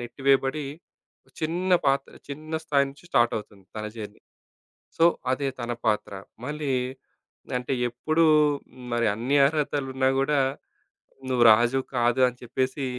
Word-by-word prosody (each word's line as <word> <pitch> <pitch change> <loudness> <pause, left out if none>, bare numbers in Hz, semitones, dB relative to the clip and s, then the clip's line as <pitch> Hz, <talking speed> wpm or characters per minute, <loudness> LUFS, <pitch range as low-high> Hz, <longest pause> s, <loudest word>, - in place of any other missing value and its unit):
నెట్టివేయబడి, 135 +3 0 0.7
చిన్న 175 +4 -1
పాత్ర, 135 0 +1 0.2
చిన్న 155 +3 -7
స్థాయి 140 -3 +3
నుంచి 140 +5 -18
స్టార్టవుతుంది 105 -4 0
తన 110 0 -4
జర్నీ. 105 -2 -8 0.8
సో 165 - +4 0.3
అదే 135 +1 -1
తన 120 0 -3
పాత్ర. 105 -2 0 0.3
మళ్ళీ 145 0 -3 0.9
అంటే 125 +2 -4 0.2
ఎప్పుడూ 155 +7 +1 0.7
మరి 120 -1 +1
అన్ని 125 +6 0
అర్హతలున్నా 140 -3 0
గూడా 145 +2 +2 0.9
"నువ్వు 125 -2 +3
రాజువి 120 +4 +3
కాదు." 120 +1 +2
అని 125 0 -5
చెప్పేసి. 130 +3 -2
135 Hz, 115 wpm, -26 LUFS, 120-145 Hz, 0.9 s, సో